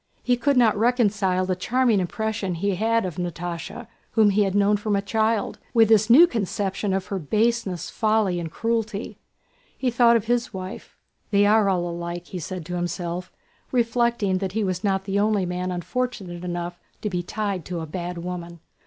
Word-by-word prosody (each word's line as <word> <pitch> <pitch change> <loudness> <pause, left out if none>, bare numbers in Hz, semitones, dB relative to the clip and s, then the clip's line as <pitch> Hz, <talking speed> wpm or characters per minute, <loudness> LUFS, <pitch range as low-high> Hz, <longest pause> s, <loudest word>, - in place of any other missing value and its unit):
He 250 - +3
could 265 +3 +1
not 235 -3 +5
reconcile 205 -5 +2
the 185 0 0
charming 235 +3 +2
impression 195 0 -2
he 200 +4 0
had 225 +3 +1
of 180 -2 -5
Natásha, 175 +5 -5 0.3
whom 215 -3 +5
he 205 +2 +2
had 195 0 -2
known 205 +1 +4
from 210 0 -1
a 200 - +1
child, 220 +1 0 0.2
with 225 -2 +6
this 220 0 +4
new 290 +9 +9
conception 200 - -2
of 190 0 -1
her 195 - -2
baseness, 215 +1 0
folly, 215 -5 +1
and 165 -1 -4
cruelty. 225 -1 -2 0.6
He 255 -2 0
thought 235 0 +5
of 225 -2 +1
his 240 +1 0
wife. 185 0 -8 0.3
"They 200 0 +4
are 210 -1 +4
all 175 -2 0
alike!" 170 0 -5
he 185 - -5
said 175 +1 -6
to 180 +2 -4
himself, 175 +1 -3 0.4
reflecting 235 -5 +1
that 190 -1 -3
he 220 0 0
was 185 0 -2
not 195 -2 +1
the 195 +1 -1
only 205 -2 +2
man 180 +1 -3
unfortunate 185 -1 -3
enough 175 0 -4 0.2
to 210 - 0
be 180 -1 -1
tied 200 -1 -3
to 175 -2 -4
a - - -4
bad 175 +2 -5
woman. 170 -1 -6
200 Hz, 185 wpm, -24 LUFS, 180-225 Hz, 0.6 s, new